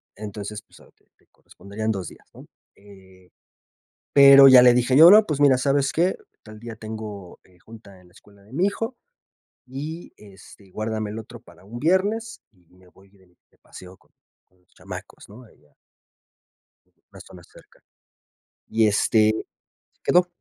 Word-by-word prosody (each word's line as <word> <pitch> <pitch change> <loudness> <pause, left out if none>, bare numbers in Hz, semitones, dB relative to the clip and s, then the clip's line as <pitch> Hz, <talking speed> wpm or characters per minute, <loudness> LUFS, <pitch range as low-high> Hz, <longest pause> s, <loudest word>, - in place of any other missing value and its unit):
Entonces, 105 0 -9
pues, - - -23
a - - -21
ti - - -40
te - - -36
corresponderían 110 +2 -8
2 95 -6 -6
días, - - -16
¿no? - - -16 0.3
Eh, 95 -2 -20 0.8
pero 140 -1 +7
ya 125 -1 +8
le 125 -1 +5
dije 125 +2 +1
yo: 165 +3 +9
"No 210 +2 +6
pues 150 -6 -4
mira 140 -3 +4
¿sabes 140 +1 -1
qué? 175 +3 -1 0.3
Tal 110 -1 -14
día 115 -1 -10
tengo, 110 -4 -10
eh, 90 -1 -27
junta 105 -4 -17
en 90 - -23
la - - -26
escuela 100 0 -22
de 100 +3 -23
mi 170 +8 -1
hijo 225 +4 -4 0.7
y 150 +6 -9
este 100 -1 -18
guárdame 110 +1 -5
el 105 - -8
otro 110 - -13
para 95 - -21
un 115 +4 -10
viernes 205 - -2
y 90 -5 -33
me 90 0 -23
voy 95 +2 -24
de 95 -1 -27 0.2
de - - -34
paseo 90 0 -15
con - - -34 0.4
con 90 0 -37
los 90 - -40
chamacos - - -12
¿no? 110 +5 -15
Ahí 75 - -26
ah. 75 - -33 1.4
Una - - -15
zona 90 -2 -16
cerca - - -22 0.9
y 110 -1 +1
este, 110 +1 0 0.6
quedó. 180 0 +2
110 Hz, 170 wpm, -22 LUFS, 100-135 Hz, 1.4 s, yo